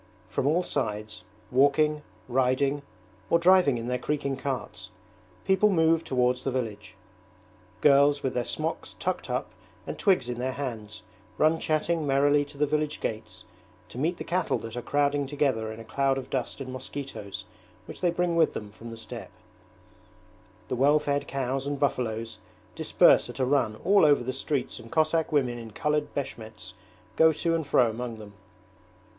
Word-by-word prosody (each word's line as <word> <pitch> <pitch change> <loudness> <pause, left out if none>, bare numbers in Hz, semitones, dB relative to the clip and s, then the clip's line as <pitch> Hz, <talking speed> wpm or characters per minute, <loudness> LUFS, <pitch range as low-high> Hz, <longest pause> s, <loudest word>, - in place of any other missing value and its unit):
From 135 - -1
all 170 +5 +2
sides, 110 -8 -3 0.3
walking, 145 +3 +3 0.3
riding, 130 +3 +1 0.5
or 170 - +5
driving 170 -6 +5
in 115 0 -5
their 125 0 -1
creaking 140 0 -2
carts, 135 -1 -5 0.6
people 190 +2 +4
move 165 -3 +3
towards 125 -1 +1
the - - 0
village. 120 -5 -4 0.9
Girls 145 0 +5
with 130 - -1
their 125 - 0
smocks 155 +6 -4
tucked - - -3
up - - -2 0.3
and - - -6
twigs 185 - +3
in 120 -1 -4
their 130 +1 -1
hands 115 -6 -6 0.3
run 160 +1 +3
chatting 155 0 0
merrily 145 +1 +3
to 145 0 -14
the 150 - +3
village 150 +1 -1
gates 110 -4 -5 0.4
to 125 - -8
meet 165 +5 0
the - - -5
cattle 180 0 0
that 115 0 -7
are 120 - -3
crowding 145 +1 +1
together 130 -6 0
in 110 - -9
a 115 - -9
cloud 135 +3 +1
of 135 - -7
dust 130 -2 -3
and 130 -2 -6
mosquitoes 130 -5 -7 0.4
which - - -10
they 180 - +3
bring 175 0 0
with 165 -2 +3
them 105 -1 -6
from 115 +2 -11
the 115 - -8
steppe. 110 - -8 1.4
The - - -2
well 140 +4 +4
fed 145 -1 -1
cows 135 0 -2
and 145 -1 -2
buffaloes 115 -5 -1 0.3
disperse - - +4
at - - -8
a 130 - +1
run 130 -5 +1
all 200 0 +5
over 145 -4 +5
the 130 +2 -3
streets 135 0 -2
and - - -13
Cossack 160 0 +1
women 125 -5 +1
in 115 -1 -8
coloured 150 +6 -1
beshmets 110 -9 -6 0.4
go 160 0 +6
to 165 +2 -1
and 160 -3 -1
fro 125 -3 +4
among 115 0 -5
them. 105 -2 -11
140 Hz, 170 wpm, -27 LUFS, 125-150 Hz, 1.4 s, go